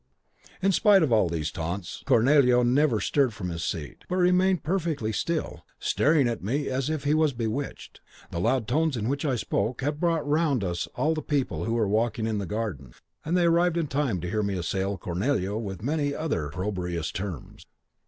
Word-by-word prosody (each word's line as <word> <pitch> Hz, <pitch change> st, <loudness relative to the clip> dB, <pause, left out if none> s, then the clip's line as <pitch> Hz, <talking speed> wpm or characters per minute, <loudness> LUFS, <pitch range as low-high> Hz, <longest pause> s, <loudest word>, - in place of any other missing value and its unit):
"In 195 Hz, -, +4 dB
spite 200 Hz, -1 st, +5 dB
of 145 Hz, -, +1 dB
all 105 Hz, -6 st, +3 dB
these 80 Hz, -1 st, -2 dB
taunts 85 Hz, +2 st, -5 dB
Cornelio 125 Hz, 0 st, +5 dB
never 125 Hz, -1 st, +3 dB
stirred 130 Hz, +2 st, +1 dB
from 90 Hz, -4 st, -4 dB
his 85 Hz, -1 st, -4 dB
seat, 75 Hz, -7 st, -5 dB
but 180 Hz, -, -1 dB
remained 180 Hz, 0 st, +3 dB
perfectly 160 Hz, -, -1 dB
still, 165 Hz, +7 st, -2 dB
staring 145 Hz, -3 st, +2 dB
at 115 Hz, -4 st, -3 dB
me 135 Hz, +8 st, -1 dB
as 130 Hz, +2 st, -1 dB
if 155 Hz, -3 st, -2 dB
he 145 Hz, +1 st, +2 dB
was 155 Hz, -2 st, +3 dB
bewitched. 120 Hz, +4 st, -4 dB, 0.3 s
The 85 Hz, -, -3 dB
loud 115 Hz, +5 st, +1 dB
tones 155 Hz, -3 st, +1 dB
in 110 Hz, -1 st, -2 dB
which 140 Hz, +4 st, -1 dB
I 135 Hz, -4 st, +1 dB
spoke 115 Hz, +2 st, -2 dB
had 145 Hz, +1 st, -1 dB
brought 165 Hz, -3 st, 0 dB
round 145 Hz, -6 st, +2 dB
us 85 Hz, -2 st, -2 dB
all 155 Hz, +2 st, +1 dB
the 155 Hz, -, -3 dB
people 125 Hz, -, -1 dB
who 115 Hz, -, -1 dB
were 110 Hz, -3 st, +1 dB
walking 110 Hz, +2 st, 0 dB
in 110 Hz, -2 st, -1 dB
the 100 Hz, -, -4 dB
garden, 95 Hz, -, -4 dB, 0.3 s
and 170 Hz, +4 st, 0 dB
they 175 Hz, -, +3 dB
arrived 170 Hz, 0 st, +3 dB
in 165 Hz, -, +1 dB
time 135 Hz, -9 st, -1 dB
to 90 Hz, -, -4 dB
hear 110 Hz, 0 st, 0 dB
me 100 Hz, -1 st, -1 dB
assail 95 Hz, +3 st, -2 dB
Cornelio 100 Hz, +3 st, -1 dB
with 100 Hz, -3 st, -6 dB
many 145 Hz, +1 st, 0 dB
other 110 Hz, -, -2 dB
opprobrious 90 Hz, 0 st, -3 dB
terms. 95 Hz, -8 st, -7 dB
120 Hz, 195 wpm, -26 LUFS, 100-150 Hz, 0.3 s, spite